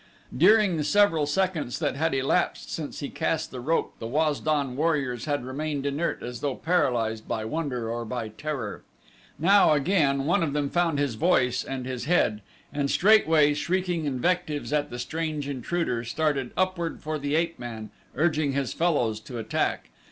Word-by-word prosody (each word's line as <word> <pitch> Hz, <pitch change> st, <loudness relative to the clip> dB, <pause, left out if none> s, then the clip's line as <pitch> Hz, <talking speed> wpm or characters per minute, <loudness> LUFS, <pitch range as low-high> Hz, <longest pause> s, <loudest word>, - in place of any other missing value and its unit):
During 200 Hz, -, +5 dB
the 150 Hz, -, 0 dB
several 165 Hz, -2 st, +3 dB
seconds 165 Hz, -5 st, -1 dB
that 145 Hz, -4 st, -1 dB
had 160 Hz, 0 st, 0 dB
elapsed 135 Hz, +7 st, 0 dB
since 155 Hz, -2 st, -5 dB
he 140 Hz, -, -4 dB
cast 160 Hz, -1 st, -2 dB
the 130 Hz, -, -6 dB
rope 155 Hz, +7 st, 0 dB
the 115 Hz, -, -5 dB
Waz 150 Hz, +3 st, +1 dB
don 145 Hz, -5 st, 0 dB
warriors 140 Hz, -5 st, 0 dB
had 145 Hz, -4 st, -1 dB
remained 145 Hz, +1 st, -3 dB
inert 145 Hz, +4 st, -1 dB
as 120 Hz, -1 st, -6 dB
though 140 Hz, 0 st, -2 dB
paralyzed 125 Hz, -10 st, 0 dB
by 110 Hz, -, -2 dB
wonder 125 Hz, -3 st, -3 dB
or 120 Hz, +1 st, -3 dB
by 115 Hz, -1 st, -4 dB
terror. 125 Hz, -2 st, -5 dB, 0.6 s
Now, 195 Hz, -1 st, +5 dB
again, 145 Hz, -3 st, +2 dB
one 170 Hz, +3 st, +2 dB
of 155 Hz, -4 st, 0 dB
them 145 Hz, -1 st, -1 dB
found 175 Hz, -3 st, +1 dB
his 140 Hz, -4 st, 0 dB
voice 125 Hz, -2 st, +2 dB
and 130 Hz, -2 st, -5 dB
his 125 Hz, -1 st, -4 dB
head 125 Hz, -10 st, +2 dB, 0.3 s
and 145 Hz, -1 st, -1 dB
straightway, 160 Hz, -8 st, +5 dB
shrieking 175 Hz, +1 st, -1 dB
invectives 150 Hz, +2 st, -1 dB
at 145 Hz, -1 st, +1 dB
the 120 Hz, -, -6 dB
strange 155 Hz, +2 st, -3 dB
intruder, 135 Hz, -2 st, -2 dB
started 140 Hz, +1 st, -1 dB
upward 185 Hz, -3 st, -1 dB
for 155 Hz, 0 st, -3 dB
the 145 Hz, +1 st, -1 dB
ape 165 Hz, -2 st, 0 dB
man, 115 Hz, -3 st, -7 dB, 0.2 s
urging 155 Hz, -1 st, +1 dB
his 135 Hz, -3 st, -1 dB
fellows 135 Hz, -11 st, +1 dB
to 120 Hz, +2 st, -8 dB
attack. 110 Hz, -1 st, -1 dB
145 Hz, 170 wpm, -26 LUFS, 125-165 Hz, 0.6 s, During